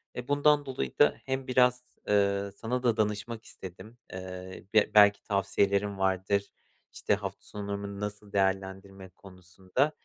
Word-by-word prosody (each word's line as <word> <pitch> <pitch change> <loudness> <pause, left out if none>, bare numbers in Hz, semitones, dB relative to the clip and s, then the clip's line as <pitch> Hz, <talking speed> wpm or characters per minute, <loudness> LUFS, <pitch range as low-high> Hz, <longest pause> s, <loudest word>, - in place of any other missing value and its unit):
E, 125 0 -6
bundan 145 0 +3
dolayı 125 - -4
da - - +5
hem 130 0 -3
biraz, 125 0 +3 0.2
eee, 100 -1 +2
sana 125 +2 -2
da 120 -3 +2
danışmak 110 +2 -2
istedim. 105 +6 -10 0.2
Eee, 95 0 -8
b 110 -1 +4
belki 105 -1 +6
tavsiyelerin 100 0 +1
vardır, 95 +1 0 0.4
işte, - - 0
hafta - - -6
sonumu 100 -1 -5
nasıl 105 0 -6
değerlendirme 95 0 -1
konusunda. 95 - -3
100 Hz, 130 wpm, -29 LUFS, 95-115 Hz, 0.4 s, belki